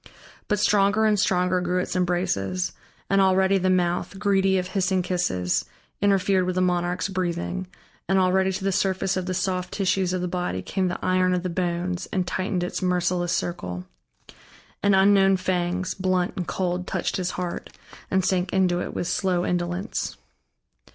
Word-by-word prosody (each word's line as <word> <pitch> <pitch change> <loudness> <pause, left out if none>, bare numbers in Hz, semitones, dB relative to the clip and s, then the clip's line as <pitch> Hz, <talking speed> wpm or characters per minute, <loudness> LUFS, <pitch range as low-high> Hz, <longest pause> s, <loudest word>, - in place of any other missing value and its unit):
But 210 - +1
stronger 205 +1 +3
and 210 -1 +3
stronger 180 -2 +2
grew 180 +1 0
its 180 - -3
embraces, 180 - 0 0.4
and 195 0 +3
already 190 +1 +3
the 185 0 +1
mouth, 180 +1 0
greedy 195 -1 +2
of 180 0 -2
hissing 190 -1 +1
kisses, 175 - 0 0.4
interfered 195 -2 +3
with 185 - -1
the 185 - +1
monarch's 180 0 0
breathing, 185 0 -3 0.4
and 190 - +3
already 190 0 +3
to 190 - -4
the 195 - +1
surface 190 0 0
of 185 -1 -3
the 185 - -1
soft 180 0 -1
tissues 190 -2 0
of 185 -1 -1
the 180 - -1
body 180 - -2
came 190 -1 -1
the 175 - -2
iron 185 0 +3
of 180 - -2
the 185 - -2
bones 175 0 -2
and 185 -2 0
tightened 185 0 -1
its 180 - -3
merciless 180 -1 0
circle, 90 - -3 1.0
and 200 -1 +4
unknown 195 0 +5
fangs, 185 0 -1
blunt 185 -1 0
and 180 - -4
cold, 180 -1 -2
touched - - -1
his 180 -1 -1
heart 180 -1 -4 0.4
and 190 -1 +1
sank 185 -1 0
into 180 -2 +2
it - - -5
with 175 - -2
slow 180 -1 0
indolence. 175 +4 -2
185 Hz, 170 wpm, -24 LUFS, 180-190 Hz, 1.0 s, unknown